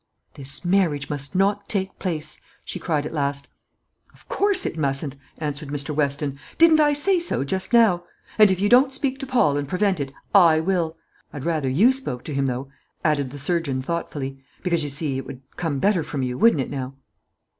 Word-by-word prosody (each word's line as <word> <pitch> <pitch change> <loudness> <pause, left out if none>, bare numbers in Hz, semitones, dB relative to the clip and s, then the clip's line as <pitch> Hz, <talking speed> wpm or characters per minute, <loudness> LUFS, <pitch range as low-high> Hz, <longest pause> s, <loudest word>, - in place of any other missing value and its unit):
"This 140 +5 -4
marriage 170 -7 +1
must 145 +3 -4
not 200 +2 +1
take 190 -2 -2
place," 155 -5 -3 0.2
she - - -5
cried, 150 -4 -1
at - - -6
last. 140 -2 -2 0.7
"Of - - -21
course 400 -2 +3
it - - -2
mustn't," 140 -2 0 0.2
answered 150 -1 -4
Mr. 145 +1 -3
Weston; 140 -1 -1 0.2
"didn't 325 -1 +6
I 295 -1 +4
say 355 +6 +2
so 340 - 0
just 190 +7 -3
now? 215 -7 +4 0.3
And 210 -1 +8
if 190 -1 0
you 205 - +2
don't 255 +4 +5
speak 270 0 -2
to 270 - -5
Paul 155 - +2
and 145 -1 -3
prevent 185 0 +1
it, 135 -1 -3 0.2
I 170 -5 +6
will. 165 -2 -1 0.3
I'd 145 -1 -7
rather 155 -5 0
you 195 - +5
spoke 260 - -5
to 150 - -6
him, 135 0 0
though," 130 +2 -3 0.4
added 145 -4 +1
the 145 - -9
surgeon 140 -3 -1
thoughtfully, 135 -4 -4 0.2
"because, 170 -3 +1
you 145 - -3
see, 140 -1 -2
it - - -8
would 130 +1 -9
come 165 -5 -2
better 195 +4 +2
from 145 -3 -4
you, 125 -1 -2
wouldn't 220 - +4
it - - -5
now?" 135 -1 -5
155 Hz, 200 wpm, -23 LUFS, 140-195 Hz, 0.7 s, And